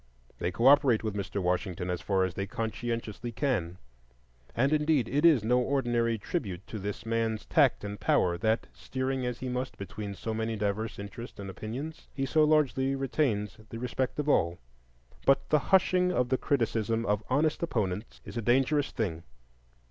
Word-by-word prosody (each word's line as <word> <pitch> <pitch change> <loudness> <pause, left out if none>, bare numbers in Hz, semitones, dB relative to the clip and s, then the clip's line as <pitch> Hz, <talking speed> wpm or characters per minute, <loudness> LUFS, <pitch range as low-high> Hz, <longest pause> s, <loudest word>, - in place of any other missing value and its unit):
They 85 - 0
cooperate 130 +3 +5
with 110 -2 -2
Mr. 100 0 -3
Washington 90 0 -1
as 90 -2 -3
far 95 +2 +1
as 95 -1 -1
they 100 +1 -3
conscientiously 115 +1 -3
can; 105 - -1 0.8
and, 135 +5 +2
indeed, 150 -5 +2
it 145 +6 +1
is 145 -10 +5
no 125 +3 +3
ordinary 120 -3 +1
tribute 100 - -4
to 110 - -6
this 100 +2 -5
man's 115 -1 -1
tact - - +3
and 100 0 -5
power 85 -1 +2
that, 110 +5 +1
steering 130 -1 -2
as 125 -1 -4
he 130 - -3
must 125 +1 -3
between 100 +1 -6
so 110 +3 -4
many 110 0 -2
diverse 105 +1 -2
interests 100 +4 -8
and 100 -1 -5
opinions, 130 +11 -6
he 135 - -1
so 155 +3 +3
largely 140 -3 +3
retains 130 -7 0
the 115 - -6
respect 125 +2 -2
of 150 0 -2
all. 85 - +2 0.7
But 135 - +3
the 150 - +4
hushing 180 -1 +4
of 125 -8 +1
the 130 - +2
criticism 115 -3 0
of 105 0 +1
honest 150 +4 +2
opponents 105 - -2
is - - -9
a 115 - -1
dangerous 135 +5 +2
thing. 85 -8 -3
115 Hz, 170 wpm, -29 LUFS, 105-135 Hz, 0.8 s, cooperate